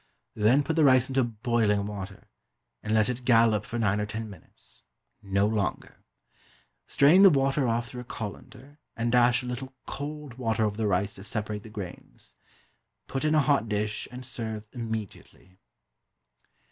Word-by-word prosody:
Then 115 +7 +3
put 160 +2 -2
the 160 - +5
rice 130 -2 +5
into 135 0 +2
boiling 110 -3 0
water, 100 -1 -7 0.5
and 105 - -4
let 110 -1 +3
it 125 0 -3
"gallop" 115 -3 +4
for 120 - -5
nine 105 -3 +1
or 105 - -2
ten 110 0 -5
minutes 90 -5 -15 0.4
no 100 0 +1
longer. 105 -2 -3 0.8
Strain 155 +7 +5
the 195 - +10
water 135 -2 +2
off 115 +1 -1
through 125 - -7
a - - -11
colander, 120 +6 -9 0.2
and 115 +1 0
dash 125 0 +4
a - - -7
little 130 +2 -6
cold 145 -2 -7
water 110 -2 +1
over 105 -1 -2
the 110 -2 0
rice 100 +1 0
to 95 - -11
separate 105 -3 -4
the 110 - -12
grains. 95 - -10 0.7
Put 135 - -4
in 155 0 +2
a 155 - +5
hot 140 -6 +1
dish, 105 0 -2
and 125 0 -8
serve 110 -4 -5
immediately. 110 -5 -7
115 Hz, 165 wpm, -27 LUFS, 105-130 Hz, 0.8 s, the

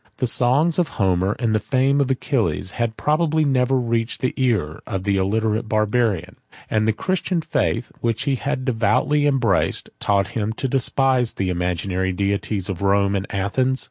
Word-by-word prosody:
The 130 - 0
songs 135 +8 +2
of 175 - +2
Homer, 95 0 +1
and 115 -2 0
the 110 - +2
fame 135 +4 +1
of 135 - 0
Achilles, 125 -7 -1
had 115 -2 -2
probably 155 0 +1
never 130 -1 +2
reached 115 -1 -1
the 130 - 0
ear 105 - 0
of 95 -1 -3
the 100 -1 +1
illiterate 110 +3 0
Barbarian; 110 -4 0 0.3
and 110 0 +2
the - - +4
Christian 185 - -1
faith, 135 -7 -1
which 115 +2 -1
he 140 -1 0
had 135 0 -2
devoutly 130 +4 +2
embraced, 125 -9 +1
taught 100 -1 +1
him 110 0 -2
to 135 - -3
despise 130 -1 +1
the 95 -1 -2
imaginary 90 +1 -1
deities 100 0 -1
of 95 -3 -4
Rome 100 0 +2
and 100 +1 -2
Athens. 125 +7 0
115 Hz, 170 wpm, -21 LUFS, 100-130 Hz, 0.3 s, the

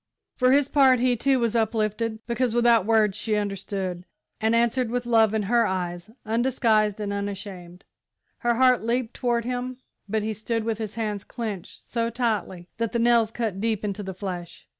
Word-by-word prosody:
For 255 0 +3
his 280 0 +4
part 270 -3 +5
he, 245 0 +2
too, 265 +3 +2
was 235 -1 0
uplifted, 220 0 -1
because 240 -1 -1
without 235 -4 +4
words 215 -3 +3
she 215 0 -1
understood, 195 -3 -3 0.4
and 220 +1 +2
answered 235 +1 +2
with 245 +1 -2
love 225 -3 +4
in 220 -1 0
her 230 +2 +3
eyes. 175 0 -3 0.2
Undisguised 220 -3 +1
and 205 -1 -3
unashamed, 195 -3 -6 0.6
her 240 0 +1
heart 255 0 +4
leaped 235 +1 -1
toward 235 -2 0
him, 250 0 -3 0.3
but 220 0 0
he 220 0 -2
stood 220 +2 -2
with 225 -1 -2
his 215 -1 -5
hands 210 -3 -3
clenched 215 -7 -7
so 230 -1 -1
tightly 215 -7 -2
that 230 -1 -2
the - - +1
nails 235 -1 +4
cut 220 -4 -3
deep 220 -2 -1
into 205 0 -3
the 190 -2 -6
flesh. 180 -3 -7
225 Hz, 180 wpm, -25 LUFS, 205-240 Hz, 0.6 s, part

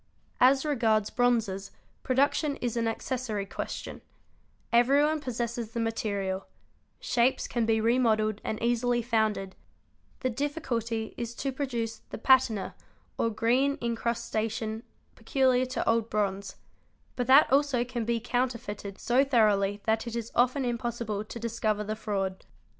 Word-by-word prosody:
As 265 +3 +5
regards 225 -7 +1
bronzes, 225 -6 +1 0.3
production 280 +3 +1
is 240 -3 -3
an 230 -1 0
accessory 225 -3 -3
question; 195 - -6 0.7
everyone 285 +6 +4
possesses 235 -3 -4
the 235 - -2
material; 200 -4 -2 0.5
shapes 245 +2 +1
can 235 -2 -1
be 220 -1 +3
remodelled 220 -2 +2
and 215 - -3
easily 240 0 +1
founded; 215 -5 0 0.7
the 255 - +1
difficulty 235 -5 -2
is 235 0 -5
to 275 +2 -2
produce 240 -5 -3
the - - -6
patina 235 -4 +3 0.5
or 230 - +2
green 245 +6 +1
incrustation 225 -2 -2 0.3
peculiar 255 +2 +2
to 255 - -3
old 230 0 +2
bronze; 200 -2 -2 0.6
but 245 -1 -2
that 270 +1 +6
also 275 -4 +3
can 245 -2 -3
be 230 +1 0
counterfeited 235 -5 -3
so 250 +3 +3
thoroughly 210 -6 +2
that 225 +1 0
it 235 - -4
is 230 -1 -4
often 255 +2 +2
impossible 235 -3 -2
to 215 - -9
discover 220 -2 -1
the 215 +1 -3
fraud. 195 -3 -3
235 Hz, 130 wpm, -28 LUFS, 215-250 Hz, 0.7 s, that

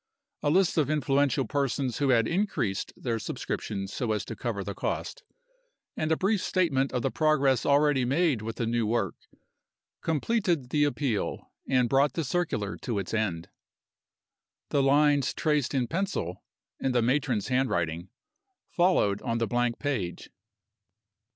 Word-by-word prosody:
A 145 - +1
list 180 +1 +3
of 145 - +1
influential 140 -2 +2
persons 135 -3 -1
who 140 -2 +2
had 115 -3 +4
increased 170 - -1
their 115 -3 -2
subscriptions 100 -2 -4
so 115 -3 -1
as 105 -3 -2
to - - -6
cover 110 -5 -3
the 100 - -5
cost, - - -3 0.7
and 155 0 -1
a 160 - +3
brief 200 +1 +1
statement 145 -9 +1
of 125 -2 -2
the 135 - 0
progress 140 -4 +2
already 145 -2 +4
made 140 -1 +1
with 115 +1 -5
the 115 - -2
new 115 -1 0
work, 110 -5 0 0.9
completed 165 - 0
the 145 -1 +3
appeal, 140 -7 -2 0.2
and 130 -2 +3
brought 135 +1 +3
the 165 - -1
circular 135 - -1
to 115 -4 -3
its 100 +1 -4
end. 95 -7 -1 1.2
The 140 - +2
lines 145 0 +3
traced 150 -4 0
in 130 -2 +2
pencil 165 - -3 0.4
(in 130 - 0
the 120 -2 +3
matron's 125 -4 0
handwriting) 90 -10 0 0.6
followed 175 - +2
on 115 -2 -1
the 115 - +1
blank 120 0 0
page. 115 -12 -3
130 Hz, 150 wpm, -28 LUFS, 115-150 Hz, 1.2 s, had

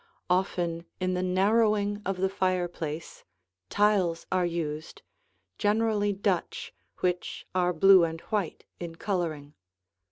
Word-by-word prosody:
Often 175 -2 0
in 185 0 0
the 180 - 0
narrowing 205 +2 +2
of 195 -1 -1
the 190 +1 +2
fireplace, 175 -4 -2 0.5
tiles 200 -5 +2
are 185 -1 +2
used, 155 -2 -4 0.6
generally 210 -1 +2
Dutch, 195 -2 -2 0.3
which 180 -1 -1
are 180 -1 +2
blue 185 +2 +7
and 165 0 -1
white 205 -7 -3
in 170 -1 -6
coloring. 165 -7 -3
185 Hz, 115 wpm, -28 LUFS, 170-200 Hz, 0.6 s, blue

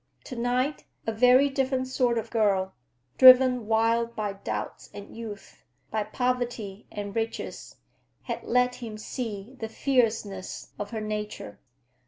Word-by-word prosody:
To 255 - -8
night 250 +4 -1 0.2
a 225 - 0
very 250 +5 +5
different 265 -1 0
sort 250 -2 +1
of 225 0 -4
girl—driven 205 - +4
wild 230 +1 +2
by 210 -2 -2
doubts 195 - -5
and 205 0 -10
youth, 220 -3 -9 0.3
by 220 - 0
poverty 240 -3 -2
and 205 -1 -6
riches—had 225 0 -6
let 250 +1 +2
him 225 -3 -7
see 220 0 -6
the 225 - -4
fierceness 220 -7 -1
of 205 - -4
her 220 -2 -4
nature. 210 - -5
225 Hz, 125 wpm, -27 LUFS, 205-250 Hz, 0.3 s, very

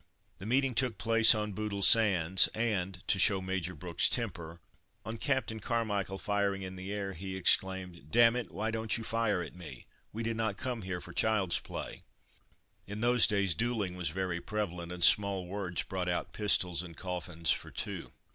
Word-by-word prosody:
The 95 - -7
meeting 130 +2 +2
took 125 -1 -1
place 115 0 +6
on 105 -1 -2
Bootle 105 -1 -3
Sands, 95 -6 +4
and, 95 -5 -2
to 95 - +2
show 95 +1 +4
Major 95 -1 -3
Brooks's 85 +3 +1
temper, 85 -1 -4 0.5
on 110 +1 -5
Captain 130 -6 -1
Carmichael 105 -4 -2
firing 100 -1 -1
in 95 0 -7
the 95 +2 -7
air, 100 -2 -3
he 95 +2 -6
exclaimed: 95 -4 0
"D 120 - +1
it, 120 +1 +4
why 110 +6 -3
don't 110 -1 -1
you 115 - -6
fire 110 -5 0
at 80 - -9
me 80 -8 -10 0.3
we 115 +2 -5
did 115 0 -2
not 110 -3 -1
come 125 -3 -4
here 90 -2 -4
for 85 - -10
child's 100 -4 +2
play!" - - -7 0.9
In 105 +2 -6
those 120 0 +4
days 100 -4 +1
duelling 105 -1 -2
was 90 -4 -2
very 90 0 -3
prevalent, 90 -5 -4
and 90 -1 -4
small 100 0 +5
words 95 -1 -2
brought 90 -1 -3
out 90 - -2
pistols 90 -5 +3
and 85 -3 -10
coffins 90 -3 -2
for - - -2
two. - - -5
95 Hz, 180 wpm, -31 LUFS, 90-110 Hz, 0.9 s, place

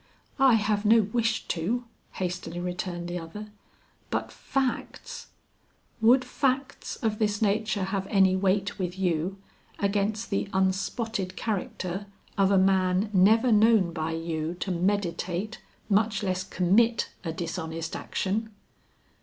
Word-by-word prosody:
"I 265 -3 +6
have 210 -1 +1
no 220 +1 +6
wish 225 +2 -1
to," 210 +9 -1 0.3
hastily 175 -2 -4
returned 175 -1 -4
the 175 0 -3
other, 210 +6 -8 0.6
"but - - -2
facts 270 -2 -3 0.4
" - - -38
"Would 250 +3 +5
facts 265 +1 -1
of 215 -2 0
this 210 -2 +1
nature 210 -1 +1
have 190 0 -2
any 190 -2 +4
weight 195 +2 0
with 180 0 -3
you 180 0 0 0.4
against 205 +2 -1
the 195 0 -1
unspotted 190 +1 -1
character 195 -2 -3 0.3
of 195 -1 +3
a 200 - +4
man 190 +1 +3
never 220 +6 +5
known 215 -5 +4
by 160 0 -2
you 165 0 -3
to 190 - -1
meditate, 185 +2 -1 0.3
much 210 0 +2
less 185 -1 -1
commit 195 +6 +2
a 165 - -2
dishonest 165 -1 -4
action?" 215 +4 -2
195 Hz, 130 wpm, -27 LUFS, 180-220 Hz, 0.6 s, I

